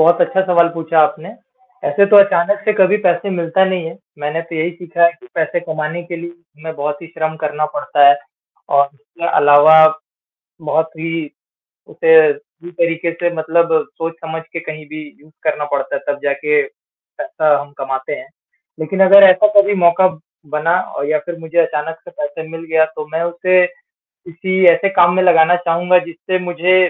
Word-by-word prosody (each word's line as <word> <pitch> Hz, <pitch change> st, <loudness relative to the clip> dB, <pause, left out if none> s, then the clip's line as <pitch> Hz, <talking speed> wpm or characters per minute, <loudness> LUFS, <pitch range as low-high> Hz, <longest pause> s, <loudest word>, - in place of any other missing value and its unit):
बहुत 170 Hz, +2 st, +4 dB
अच्छा 190 Hz, -, +1 dB
सवाल 170 Hz, -2 st, +3 dB
पूछा 165 Hz, 0 st, -2 dB
आपने। 155 Hz, +2 st, 0 dB, 0.6 s
ऐसे 200 Hz, -, +3 dB
तो 210 Hz, -, +7 dB
अचानक 200 Hz, 0 st, +3 dB
से 215 Hz, -, +2 dB
कभी 195 Hz, 0 st, +3 dB
पैसे 180 Hz, +1 st, 0 dB
मिलता 175 Hz, +1 st, 0 dB
नहीं 185 Hz, -2 st, -2 dB
है। 165 Hz, -, -8 dB, 0.2 s
मैंने 150 Hz, +2 st, -3 dB
तो 165 Hz, 0 st, -11 dB
यही 160 Hz, +2 st, -1 dB
सीखा 170 Hz, -1 st, -1 dB
है 170 Hz, -, +5 dB
कि -, -, -17 dB
पैसे 165 Hz, +1 st, -1 dB
कमाने 160 Hz, 0 st, -5 dB
के 175 Hz, 0 st, -8 dB
लिए 170 Hz, +1 st, -8 dB, 0.3 s
हमें 160 Hz, 0 st, -7 dB
बहुत 145 Hz, +1 st, -4 dB
ही -, -, -9 dB
श्रम 160 Hz, -1 st, -4 dB
करना 150 Hz, -1 st, -2 dB
पड़ता 145 Hz, -1 st, +3 dB
है 140 Hz, -, +5 dB, 0.6 s
और 140 Hz, 0 st, +3 dB
इसके 145 Hz, +4 st, -8 dB
अलावा 145 Hz, +2 st, +6 dB, 0.9 s
बहुत 160 Hz, +1 st, -1 dB
ही 165 Hz, 0 st, -4 dB, 0.6 s
उसे 485 Hz, 0 st, +3 dB, 0.2 s
उसी 425 Hz, -, -15 dB
तरीके 170 Hz, 0 st, -2 dB
से 175 Hz, +1 st, -2 dB
मतलब 165 Hz, +1 st, 0 dB, 0.3 s
सोच 165 Hz, 0 st, -5 dB
समझ 160 Hz, 0 st, -7 dB
के 165 Hz, -, -5 dB
कहीं 155 Hz, -1 st, -9 dB
भी 155 Hz, +1 st, -8 dB, 0.2 s
यूज़ 155 Hz, +1 st, -23 dB
करना 155 Hz, -1 st, -1 dB
पड़ता 140 Hz, -1 st, -2 dB
है, -, -, -5 dB
तब 145 Hz, 0 st, -2 dB
जाके 435 Hz, -, 0 dB
पैसा 330 Hz, -, -3 dB
हम 145 Hz, -, -14 dB
कमाते 135 Hz, -1 st, -4 dB
हैं। 320 Hz, +2 st, -11 dB, 0.5 s
लेकिन 175 Hz, +5 st, -4 dB
अगर 200 Hz, +1 st, +7 dB
ऐसा 185 Hz, +3 st, +4 dB
कभी 200 Hz, +1 st, +4 dB
मौका 180 Hz, 0 st, +3 dB, 0.4 s
बना 150 Hz, +3 st, 0 dB, 0.2 s
औ -, -, -3 dB
या 155 Hz, 0 st, +1 dB
फिर 175 Hz, -1 st, -6 dB
मुझे 165 Hz, +1 st, -5 dB
अचानक 160 Hz, -1 st, -1 dB
से -, -, -12 dB
पैसा 290 Hz, -, -6 dB
मिल 165 Hz, 0 st, -8 dB
गया, 160 Hz, 0 st, +3 dB
तो 155 Hz, -1 st, -9 dB
मैं 160 Hz, +1 st, -1 dB
उसे 180 Hz, +1 st, +2 dB
किसी 185 Hz, -, -6 dB
ऐसे 195 Hz, -, 0 dB
काम 175 Hz, -2 st, +3 dB
में 185 Hz, -, +2 dB
लगाना 170 Hz, -1 st, +4 dB
चाहूँगा 175 Hz, +1 st, +1 dB
जिससे 170 Hz, +2 st, -4 dB
मुझे 175 Hz, +1 st, +1 dB
170 Hz, 185 wpm, -16 LUFS, 155-180 Hz, 0.9 s, तो